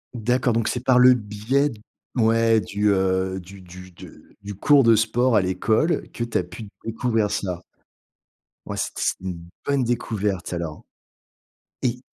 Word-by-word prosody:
D'accord, 120 +1 +1
donc 115 -1 0
c'est 125 0 -2
par 130 -1 +4
le 125 0 +8
biais 115 +6 0
d 110 - -11 0.4
ouais, 115 -1 +3
du, 105 +2 0
heu, 95 0 0
du 95 +2 -13
du 90 +1 -12
de - - -15
du 100 -1 -7
cours 140 +6 +5
de 115 -1 +6
sport 115 +2 +2
à 100 - +5
l'école 110 - 0
que 120 - -4
tu 120 - -1
as 90 - 0
pu 105 +4 -10 0.2
découvrir 115 -2 0
cela. 90 -3 -3 1.1
Ouais, - - -5
c'est - - -2
c'est - - 0
une 85 -3 -6 0.2
bonne 140 -2 +1
découverte, 105 -6 -2
alors. 85 -3 -5 1.0
Et 125 -1 0
110 Hz, 165 wpm, -23 LUFS, 95-120 Hz, 1.1 s, le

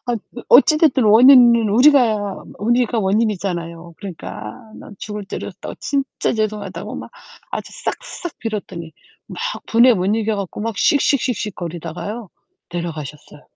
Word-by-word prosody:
아 245 - 0 0.3
어찌됐든 285 0 +5
원인은 235 0 +7
우리가 220 -4 +3 0.2
우리가 240 +2 +1
원인이잖아요. 185 -5 -2
그러니까 110 - -8 0.2
난 205 - -12
죽을 210 -1 -6
죄를 - - -6
졌다고 185 - -9
진짜 275 -2 -2
죄송하다고 210 -4 -4
막 - - -8 0.4
아주 - - -5
싹싹 355 -9 -5
빌었더니 190 -7 -6 0.4
막 - - -9 0.3
분에 240 +2 +5
못 185 -2 -1
이겨 220 -1 -1
갖고 200 0 -5
막 225 -1 -3
씩씩씩씩거리다가요 210 - -1 0.4
내려가셨어요. 155 -4 -7
210 Hz, 320 characters per minute, -19 LUFS, 180-240 Hz, 0.4 s, 원인은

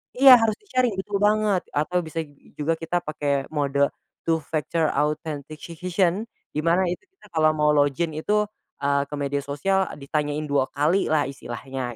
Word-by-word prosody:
iya, 260 0 +10
harus 225 -2 +2
disaring, 255 - 0
betul 200 +1 -2
banget 210 -2 +3
atau 155 +5 +1
bisa 160 0 -5
ju 145 - -20 0.3
juga 150 +2 +1
kita 165 +2 -1
pakai 145 -2 -1
mode 140 -2 +2 0.4
Two-Factor 160 0 0
Authentication 160 +5 -1 0.3
di - - -2
mana 170 +3 +3
itu 180 - -4
kita 380 - -20
kalau 155 -1 +3
mau 150 0 +3
login 145 +3 +2
itu, 210 +6 +2 0.4
eee, 140 0 +2
ke 145 - -5
media 140 0 -1
sosial 190 +7 +1
ditanyain 145 +1 -2
2 135 -2 +2
kalilah 155 0 +2
istilahnya. 130 -1 -6
155 Hz, 150 wpm, -24 LUFS, 145-180 Hz, 0.4 s, iya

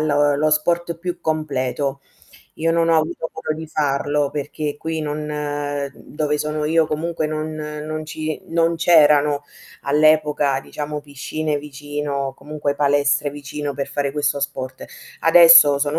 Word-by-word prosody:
lo 145 -1 +2
lo 155 +2 +1
sport 170 +2 +1
più 180 0 -5
completo. 140 -3 -2 0.6
Io 165 +1 +1
non 165 0 +2
ho 165 - +4
avuto 160 +1 -3
modo 160 -1 -3
di 160 - -6
farlo, 145 -1 0
perché 150 0 -4
qui 160 0 -3
non 150 -1 -3
n 145 -1 -3
n - - -17
dove 150 -1 0
sono 150 0 -2
io, 160 +1 +3
comunque 155 +1 -2
non 155 0 -3
non 155 0 -5
ci 155 0 -4
non 165 0 +1
c'erano 150 -3 +4 0.4
all'epoca, 150 -2 +3
diciamo, 150 +1 -5
piscine 145 +1 -3
vicino 145 0 -5 0.2
o 135 - -8
comunque 145 0 -3
palestre 145 0 +2
vicino 145 0 -5
per 140 0 -4
fare 140 -1 -2
questo 145 0 0
sport. 135 -2 -4 0.4
Adesso 165 -3 +8
sono 145 +2 0
150 Hz, 150 wpm, -21 LUFS, 145-155 Hz, 0.6 s, Adesso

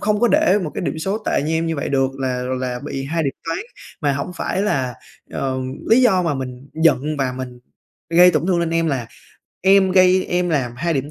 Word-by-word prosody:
không 210 0 0
có 240 - +4
để 195 0 +4
một 150 - -4
cái - - -3
điểm 160 - -2
số 195 +6 -2
tệ - - +1
như 155 +2 -2
em 165 +1 0
như 165 -1 -2
vậy 140 - -3
được, 135 -1 +1
là 130 -1 -1 0.2
là 125 -1 -3
bị 135 - -4
2 160 +4 -1
điểm 140 -3 -1 0.2
toán. - - -1 0.4
Mà 145 -4 +1
hổng 140 +6 -3
phải 190 +3 -1
là 130 - -1 0.4
ờ, 130 -1 -2 0.3
lý 245 +3 +6
do 190 -7 +4
mà 165 -4 0
mình 130 0 -7
giận 155 -2 +2
và 130 -2 0
mình 125 -1 -7 0.5
gây 180 +2 +7
tổn 155 -1 0
thương 185 -2 +2
lên 165 -1 -1
em 165 0 +1
là 130 -6 -1 0.5
em 190 0 +4
gây 185 0 +5
em 180 0 0
làm 135 -7 0
2 170 +6 -1
điểm 140 +2 -2
155 Hz, 230 wpm, -20 LUFS, 135-180 Hz, 0.5 s, gây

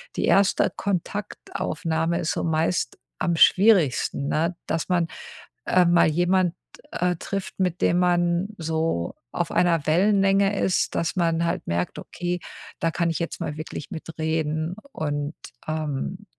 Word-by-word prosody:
die - - 0
1 200 0 +3
Kontaktaufnahme 170 -3 -2
ist 160 - -1
so - - -2
meist 160 -3 0 0.2
am 170 - +1
schwierigsten, 175 - +4
ne, 165 +3 0
dass 165 - -2
man, 175 -2 +2 0.6
äh, 180 -1 +4
mal 170 -1 +5
jemand, 175 +2 +2 0.4
äh, 180 0 0
trifft, 195 +1 -5
mit 180 -2 0
dem 175 - +3
man 175 +1 +2
so 160 - -1 0.2
auf - - -2
einer 165 -4 +2
Wellenlänge 195 +3 +3
ist, 185 - +1
dass 165 - -1
man 170 -1 +1
halt 175 +2 -2
merkt: 85 +1 -2
„Okay, 175 0 -4 0.4
da 165 - +1
kann 170 0 0
ich 165 - -3
jetzt 170 - -4
mal 150 - -3
wirklich 155 -1 -7
mitreden 160 +1 -2 0.2
und, 145 - -3 0.3
ähm, 155 +5 -3
170 Hz, 140 wpm, -24 LUFS, 160-180 Hz, 0.6 s, mal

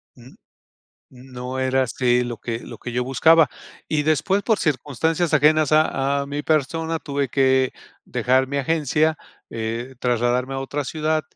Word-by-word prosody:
N 125 +1 -16 0.8
n 130 0 -16
no 125 +1 -5
era 130 0 +2
así 125 +1 +1
lo 120 -1 -5
que 115 +1 -4
lo 115 - -10
que 120 - -7
yo 125 +1 -1
buscaba. 160 +4 +4 0.4
Y 150 -1 +1
después, 190 +6 +1
por 220 -3 +1
circunstancias 155 +3 -1
ajenas 155 0 +4
a 140 -2 +2
a - - -6
mi 145 +1 -4
persona, 160 +2 0
tuve 140 -3 -2
que 130 0 +2 0.3
dejar 130 +1 +1
mi 140 - -3
agencia, 155 +2 +1 0.3
eh, 115 +3 -4
trasladarme 125 +2 0
a - - -2
otra 145 +1 -3
ciudad 155 +1 -1
135 Hz, 160 wpm, -22 LUFS, 125-155 Hz, 0.8 s, buscaba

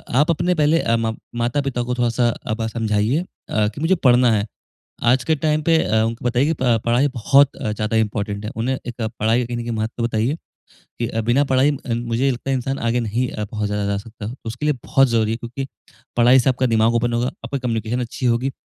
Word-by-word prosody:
आप 145 +5 +4
अपने 175 +3 +1
पहले 155 +1 +3
अ, 115 - +1
म 115 -1 -1 0.3
माता-पिता 130 0 -1
को 125 +1 -2
थोड़-सा 120 0 +1
अ, - - -7
आप 110 +1 -2
समझाइए 110 +5 0 0.3
अ, 105 -1 +1
कि 110 +7 -6
मुझे 170 +4 +3
पढ़ना 125 -6 +4
है। 105 -1 0 0.6
आज 125 +2 +3
के 160 - +2
टाइम 155 +1 0
पे 165 +1 +4
अ, 110 +1 +2
उनको 115 +2 -3
बताइए 120 +2 +2
कि 160 - +2
प 120 -3 +3
पढ़ाई 120 +4 +3
बहुत 140 +4 +4
अ, 105 - -3
ज़्यादा 105 +1 -1
इम्पोर्टेंट 105 -1 -1
है। 105 - -4
उन्हें 125 +4 -1
एक 120 0 -6
पढ़ाई 110 +1 0
का - - -2
कहीं 120 0 -4
न - - -3
कहीं 120 - -4
महत्व 110 +2 -3
बताइए 115 +4 0 0.7
कि 120 - +1
अ, 115 - -2
बिना 120 +6 +2
पढ़ाई 135 +1 +3 0.2
अ, 120 - 0
मुझे 120 +1 -1
ये 140 - +4
लगता 125 +2 -5
है 135 - +2
इंसान 135 +2 -2
आगे 115 +1 0
नहीं 120 +3 -1 0.2
बहुत 105 -1 -1
ज़्यादा 105 0 -1
जा 100 0 0
सकता 110 0 -9
हो। 115 - -5
उसके 120 +7 -3
लिए 150 - +3
बहुत 135 0 +4
ज़रूरी 115 -2 +1
है - - -1
क्योंकि 120 +3 -5 0.5
पढ़ाई 120 +2 +6
से 130 - +2
आपका 130 0 0
दिमाग 115 0 +3
ओपन 120 +1 +1
होगा, 120 +1 +1 0.2
आपकी 140 - -3
कम्युनिकेशन 115 -1 -2
अच्छी 125 +1 -3
होगी। 125 +3 +1
120 Hz, 235 wpm, -21 LUFS, 115-130 Hz, 0.7 s, पढ़ाई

